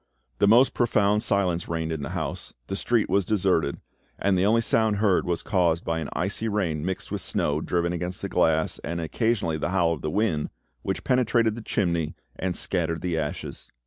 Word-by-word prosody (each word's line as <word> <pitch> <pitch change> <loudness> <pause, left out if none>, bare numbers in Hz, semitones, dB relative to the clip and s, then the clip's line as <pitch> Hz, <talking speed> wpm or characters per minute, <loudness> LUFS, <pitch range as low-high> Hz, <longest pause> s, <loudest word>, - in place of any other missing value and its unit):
The - - +4
most 120 +5 +6
profound 105 -3 +2
silence 95 -6 0
reigned 80 -1 -2
in 80 -2 -3
the 70 - -4
house, - - -4
the 95 - -4
street 115 +2 +1
was 100 - +2
deserted, 90 -7 +1 0.4
and 100 -1 +2
the 95 +2 +2
only 115 +2 +4
sound 110 -2 +2
heard 100 -3 +2
was 85 -1 -1
caused 85 -5 +1
by 80 0 -1
an 80 - -4
icy 100 +5 -1
rain 85 -8 -1
mixed 95 +1 -4
with - - -2
snow 75 +1 0
driven 85 +1 0
against 90 +4 -4
the - - -1
glass, 80 -4 +1
and 85 +1 -4
occasionally 85 -1 0
the 85 - -1
howl 85 -3 +2
of 80 - -6
the 75 - -2
wind, 90 -5 0 0.3
which - - -3
penetrated 120 -3 +2
the 115 - -7
chimney 85 -7 -1 0.2
and 90 -1 -2
scattered 85 -3 -1
the 90 -2 -1
ashes. 75 -2 -4
90 Hz, 195 wpm, -25 LUFS, 80-105 Hz, 0.4 s, most